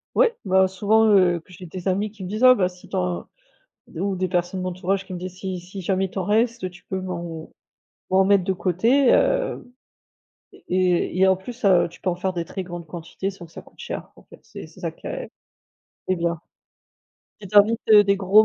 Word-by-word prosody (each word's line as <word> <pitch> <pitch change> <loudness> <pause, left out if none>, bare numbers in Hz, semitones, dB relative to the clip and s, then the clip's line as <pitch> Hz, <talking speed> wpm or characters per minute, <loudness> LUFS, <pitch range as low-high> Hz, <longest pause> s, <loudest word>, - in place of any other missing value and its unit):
Ouais. 475 -1 +4
Bah, 190 0 +4
souvent, 210 +4 +2
heu, 175 -2 +3
que 165 - -21
j'ai 180 +1 -11
des 180 +2 -7
amis 200 +3 0
qui 200 -3 -11
me 180 - -5
disent: 215 +5 -3
«Ah, 255 0 +9
bah, 185 -7 +1
si 180 0 -16
tu - - -6
en» 90 -1 -2 0.6
d - - -10
ou 195 +1 -1
des 185 0 -1
personnes 180 +1 -1
de - - -3
l'entourage 185 +2 -2
qui 190 - -8
me 180 - -5
disent: 185 0 -7
«Si 190 -1 -4
si 185 +3 -9
jamais, 190 +1 0
il - - -6
t'en 190 - -3
reste, 230 +4 +1
heu, 185 - -1
tu 175 - -17
peux 190 - -2
m'en 170 -3 -6 0.6
m'en 190 +1 +4
mettre, 200 -1 +4
de 190 +1 0
côté?» 230 - +2
hem, - - +2 0.9
et - - -17
et 180 -1 +2
il - - -4
y 190 - +5
a 190 - +5
en 190 - +3
plus, 235 +6 -10
heu, 185 -4 +4
tu 170 - -17
peux 185 - 0
en 175 - -3
faire 190 +1 -2
des 170 -2 -3
très 190 +2 -6
grandes 175 -1 -8
quantités 170 +4 -5
sans 185 -3 -12
que 165 - -23
ça - - -10
coûte - - -22
cher, - - -6
en - - -18
fait. - - -17
C'est - - -10
c'est - - -17
ça - - -2
qui - - -14
a - - -4
qui - - -35 0.8
est 185 - +2
bien. 170 -1 -2 1.0
Si 200 - -8
tu 205 - -2
invites, 220 +3 +4
heu, 210 -1 +9
des 200 0 +2
gros 200 +3 +5
185 Hz, 250 wpm, -23 LUFS, 180-200 Hz, 1.0 s, Ah